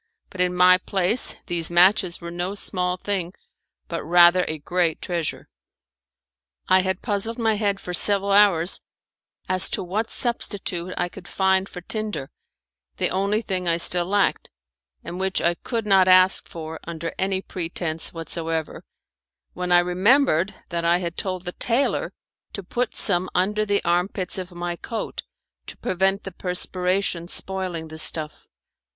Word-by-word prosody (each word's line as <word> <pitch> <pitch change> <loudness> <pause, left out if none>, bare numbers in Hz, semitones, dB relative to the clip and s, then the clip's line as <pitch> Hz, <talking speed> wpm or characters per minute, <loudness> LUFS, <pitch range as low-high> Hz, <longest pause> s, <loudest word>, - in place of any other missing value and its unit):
But 185 - -4
in 180 0 +1
my 180 0 +6
place 190 +5 +3
these 170 -2 0
matches 180 +1 +3
were 170 0 -7
no 175 +3 -3
small 180 -2 -2
thing, 185 -2 -3 0.5
but 170 - -4
rather 175 +2 +6
a 155 - -3
great 170 +1 0
treasure. 170 -3 -3 1.2
I 185 0 +5
had 190 0 -2
puzzled 220 +1 -2
my 225 -2 +1
head 205 -2 -1
for 180 - -6
several 200 +2 +3
hours 195 -4 +5 0.7
as 185 0 0
to - - -2
what 210 +6 -2
substitute 190 -7 -3
I 175 - 0
could 175 - -12
find 190 0 +1
for 180 - -9
tinder 210 -7 -3 0.7
the - - 0
only 200 +4 0
thing 185 -3 -2
I 165 0 +2
still 175 0 +2
lacked, 200 0 +1 0.5
and 175 - -7
which 190 0 0
I 170 - +2
could 225 +5 -4
not 190 -2 +4
ask 185 0 +5
for 160 -1 -7
under 165 0 -5
any 190 0 +1
pretense 165 -2 -4
whatsoever 165 -1 -4 0.7
when 180 0 -4
I 175 - +7
remembered 185 - +3
that 170 -2 -2
I 170 +1 +3
had 170 -1 -4
told 185 -2 -4
the 180 - -3
tailor 240 +8 0 0.4
to 200 - -6
put 240 +6 -3
some 185 -2 +3
under 210 +4 +1
the 200 0 +1
armpits 180 +2 -1
of 185 0 -7
my 175 0 -4
coat 225 +4 -5 0.5
to - - -8
prevent 190 +2 0
the 195 - -7
perspiration 180 0 -1
spoiling 185 -4 -4
the 160 0 -7
stuff. 155 -1 -1
185 Hz, 155 wpm, -23 LUFS, 175-195 Hz, 1.2 s, I